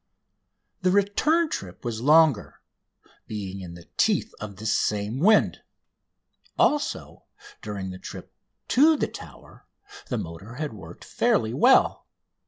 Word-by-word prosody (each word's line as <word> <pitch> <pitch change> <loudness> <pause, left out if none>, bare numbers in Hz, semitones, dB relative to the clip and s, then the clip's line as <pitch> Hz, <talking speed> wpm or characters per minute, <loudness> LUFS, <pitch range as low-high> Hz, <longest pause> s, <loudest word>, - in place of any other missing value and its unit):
The 185 - +2
return 205 - +2
trip 90 +3 -6
was 115 -2 -3
longer, 150 -4 +3 0.7
being 100 -3 -6
in 85 -2 -9
the 85 -1 -14
teeth - - +1
of 105 -2 -7
this 110 +3 -1
same 105 +4 -1
wind. 210 +7 +3 1.0
Also, 295 0 0 0.4
during 100 -3 -5
the 90 - -9
trip - - -10 0.4
to 305 +4 +5
the - - 0
Tower - - -13 0.4
the 125 - -2
motor 95 +4 -8
had 150 0 -4
worked 105 - -12
fairly 110 +1 +1
well. 245 - +3
115 Hz, 125 wpm, -25 LUFS, -, 1.0 s, to